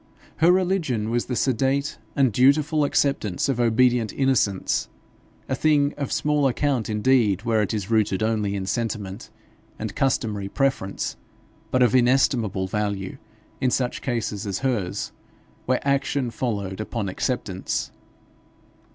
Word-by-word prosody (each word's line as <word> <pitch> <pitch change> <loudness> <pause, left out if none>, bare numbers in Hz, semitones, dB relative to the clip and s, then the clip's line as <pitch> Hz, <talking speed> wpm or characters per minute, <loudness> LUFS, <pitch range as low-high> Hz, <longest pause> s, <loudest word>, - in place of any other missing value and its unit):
Her 165 +2 +5
religion 175 - +1
was 120 0 0
the 125 - -2
sedate 135 +4 0 0.2
and 135 -5 +3
dutiful 145 +5 +3
acceptance 135 -9 0
of 135 -3 -1
obedient 120 -1 +3
innocence, 130 -8 +1 0.6
a - - -2
thing 145 +1 +2
of 140 -3 -4
small 150 -2 +2
account 130 -3 0
indeed 110 -2 +2
where 115 -2 +2
it 105 - -1
is 105 -1 -3
rooted 110 -2 +2
only 105 -3 0
in 95 -1 -3
sentiment 105 -2 -3 0.5
and - - -5
customary 110 -7 0
preference, 135 -6 -1 0.5
but 130 -1 +3
of 120 - +3
inestimable 125 -6 +2
value 100 -1 -3 0.4
in 130 - +2
such 125 0 -1
cases 110 -4 -2
as 95 -1 -1
hers, 105 -9 -1 0.6
where 130 +2 0
action 140 -2 0
followed 100 -6 -3
upon 110 -1 -3
acceptance. 95 -1 -2
120 Hz, 130 wpm, -24 LUFS, 105-135 Hz, 0.6 s, Her